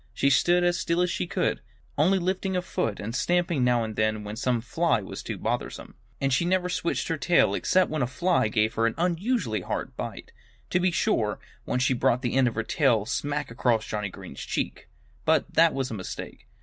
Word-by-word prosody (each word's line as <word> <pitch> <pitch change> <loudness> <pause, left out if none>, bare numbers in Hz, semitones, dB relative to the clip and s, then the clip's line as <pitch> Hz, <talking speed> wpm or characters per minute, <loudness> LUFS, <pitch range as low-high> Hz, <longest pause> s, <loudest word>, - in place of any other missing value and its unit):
She 140 - +3
stood 175 +6 +4
as 175 0 +2
still 170 +1 0
as 180 - 0
she 90 - -2
could, - - -1 0.3
only 175 +7 +3
lifting 190 +1 -1
a 180 - -1
foot 115 - -2
and 110 +3 -5
stamping 175 -2 +1
now 120 -1 +3
and 110 -1 -5
then 110 -1 0
when 105 +1 -6
some 125 +1 0
fly 160 +4 +1
was 95 - -7
too - - -5
bothersome. - - -3 0.3
And 135 -1 +1
she 150 - +2
never 180 +1 +1
switched 170 -1 -1
her 165 - 0
tail 175 +3 +3
except 185 -3 +2
when 155 -2 -1
a 125 - +1
fly 175 -1 +1
gave 110 +1 +1
her 115 0 +2
an 115 - -2
unusually 175 - 0
hard - - -4
bite. - - -6 0.4
To 180 - +3
be 180 +1 +3
sure, 110 - +1 0.3
once 125 - +1
she 130 - +3
brought 125 +1 +1
the 120 - -1
end 130 -1 +4
of 115 - -2
her 115 - -1
tail 115 -5 +2
smack 145 +3 -2
across 115 -2 +1
Johnnie 105 -2 -3
Green's - - -10
cheek. - - -4 0.3
But - - +2
that 165 0 +5
was 135 -4 -2
a - - -3
mistake. 95 -4 -7
135 Hz, 215 wpm, -26 LUFS, 115-175 Hz, 0.4 s, that